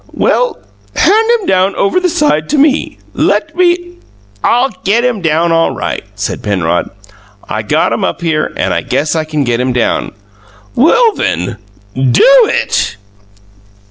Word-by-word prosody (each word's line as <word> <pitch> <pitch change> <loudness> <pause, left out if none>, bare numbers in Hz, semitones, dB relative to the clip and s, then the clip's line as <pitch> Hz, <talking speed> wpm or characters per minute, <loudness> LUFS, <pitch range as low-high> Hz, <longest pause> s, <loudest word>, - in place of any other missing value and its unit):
"Well, - - +1 0.4
hand 445 +2 +3
him 410 - -8
down 190 - +1
over 200 - +1
the 365 -1 0
side 300 - 0
to 300 - 0
me. 285 0 +1 0.2
Let 315 0 0
me 350 0 0 0.2
" 100 0 -32
"I'll 245 +3 +2
get 225 +5 +2
him 240 -5 -1
down 165 +1 +1
all 165 0 +1
right," - - -4
said - - -4
Penrod. 90 -4 -1 0.6
"I - - -3
got - - 0
him - - -2
up - - -2
here, 160 -2 -1
and - - 0
I - - -1
guess 155 +2 -1
I 160 -1 -1
can 155 -2 -2
get 120 -2 -1
him 125 0 0
down!" 120 -1 -1 0.6
"Well 450 - +3
then, 90 - -2 0.4
DO 130 -1 +2 0.2
it!" 100 - -1
185 Hz, 160 wpm, -12 LUFS, -, 0.6 s, hand